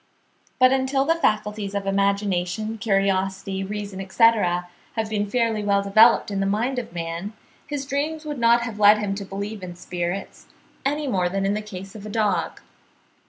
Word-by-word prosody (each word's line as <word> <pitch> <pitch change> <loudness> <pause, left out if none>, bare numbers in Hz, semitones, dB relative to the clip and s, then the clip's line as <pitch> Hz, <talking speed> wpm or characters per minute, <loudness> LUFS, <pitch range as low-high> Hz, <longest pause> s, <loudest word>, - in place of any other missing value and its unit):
But 255 0 +6
until 270 +1 +1
the 325 - +4
faculties 210 -8 -1
of 200 -1 -2
imagination, 200 +1 0
curiosity, 195 -1 0
reason, 200 -1 -5
etc., 190 -3 +3 0.3
had 220 -1 -1
been 205 -1 -1
fairly 230 -2 0
well 200 -1 +2
developed 215 +2 +5
in 200 - -1
the 195 - +1
mind 240 +6 0
of 240 - -8
man, 170 +4 -5 0.3
his 285 -2 -4
dreams 305 +3 -2
would 295 -3 -4
not 235 0 +5
have 230 -3 -5
led 210 0 +7
him 205 -2 -2
to 200 0 -5
believe 200 +2 -5
in 180 -1 -7
spirits, 175 +2 -5 0.4
any 295 +2 0
more 185 -7 +1
than 195 +1 -1
in 200 - +1
the 210 - -2
case 195 -2 -9
of 215 - -10
a - - -6
dog. 210 -1 -1
205 Hz, 175 wpm, -23 LUFS, 195-230 Hz, 0.4 s, led